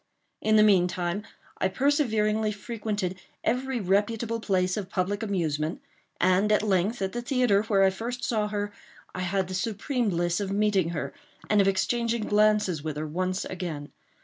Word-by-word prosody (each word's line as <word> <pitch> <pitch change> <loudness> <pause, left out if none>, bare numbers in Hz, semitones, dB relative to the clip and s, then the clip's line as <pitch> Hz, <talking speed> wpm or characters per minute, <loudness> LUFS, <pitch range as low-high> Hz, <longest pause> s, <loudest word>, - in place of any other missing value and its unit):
In 215 0 +3
the 215 - +7
meantime 180 0 +2 0.3
I - - +2
perseveringly 220 -3 +1
frequented 205 -3 -3 0.2
every 255 0 0
reputable 215 +4 0
place 185 -4 +1
of 200 -3 -4
public 195 +2 -1
amusement; 165 -7 -1 0.4
and, 185 +3 +3
at 210 - +3
length, 200 +2 +1
at 190 - -1
the 240 - -3
theatre, 245 -5 +2
where 200 -3 +3
I 190 - +5
first 240 +5 -5
saw 215 -3 0
her, 205 0 -3 0.4
I - - -5
had 190 +1 0
the 185 - -6
supreme 225 +5 -1
bliss 175 0 0
of 200 -2 -2
meeting 200 -4 +2
her, 150 -5 -4 0.4
and 210 -1 +5
of 195 - +2
exchanging 230 +4 +1
glances 210 -6 +2
with 155 -2 -4
her 155 - -2
once 185 +4 -2
again. 165 -6 -5
200 Hz, 165 wpm, -27 LUFS, 185-220 Hz, 0.4 s, the